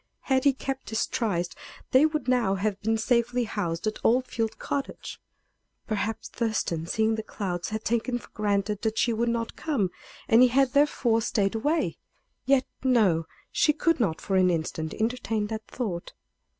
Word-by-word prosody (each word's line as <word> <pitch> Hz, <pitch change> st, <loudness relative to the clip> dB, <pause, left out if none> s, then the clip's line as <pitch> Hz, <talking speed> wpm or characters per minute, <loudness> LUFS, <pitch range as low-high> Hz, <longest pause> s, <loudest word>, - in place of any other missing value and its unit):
Had 265 Hz, 0 st, +1 dB
he 280 Hz, -, +6 dB
kept 270 Hz, 0 st, -5 dB
his 220 Hz, -, 0 dB
tryste 175 Hz, -7 st, -1 dB, 0.4 s
they 270 Hz, +4 st, +6 dB
would 305 Hz, -2 st, -3 dB
now 240 Hz, -6 st, +2 dB
have 200 Hz, +1 st, -2 dB
been 225 Hz, +2 st, +1 dB
safely 240 Hz, +1 st, +1 dB
housed 170 Hz, -5 st, -3 dB
at 215 Hz, 0 st, -3 dB
Old 250 Hz, +3 st, +3 dB
Field 225 Hz, -3 st, -2 dB
Cottage. 280 Hz, -1 st, -4 dB, 0.6 s
Perhaps 215 Hz, 0 st, -2 dB
Thurston, 200 Hz, -8 st, -1 dB
seeing 220 Hz, +4 st, +1 dB
the 220 Hz, -, -2 dB
clouds, 180 Hz, -5 st, -4 dB
had 220 Hz, 0 st, -4 dB
taken 235 Hz, +2 st, 0 dB
for -, -, -13 dB
granted 205 Hz, -1 st, -1 dB
that 220 Hz, -1 st, -1 dB
she 235 Hz, -, +2 dB
would 235 Hz, +2 st, 0 dB
not 230 Hz, -1 st, -2 dB
come, 250 Hz, -, -1 dB, 0.4 s
and 225 Hz, +2 st, +6 dB
he 255 Hz, -, +8 dB
had 265 Hz, +1 st, +2 dB
therefore 270 Hz, -5 st, +3 dB
stayed 205 Hz, -3 st, +1 dB
away. 295 Hz, +9 st, 0 dB, 0.5 s
Yet, 270 Hz, -1 st, +4 dB, 0.2 s
no; 205 Hz, -11 st, +3 dB, 0.2 s
she 300 Hz, -, +3 dB
could 330 Hz, +1 st, +1 dB
not 165 Hz, -9 st, +1 dB
for 195 Hz, -, -1 dB
an 185 Hz, -1 st, +5 dB
instant 160 Hz, -2 st, -2 dB
entertain 225 Hz, -2 st, -1 dB
that 220 Hz, 0 st, -6 dB
thought. 195 Hz, -9 st, -4 dB
225 Hz, 170 wpm, -27 LUFS, 200-250 Hz, 0.6 s, he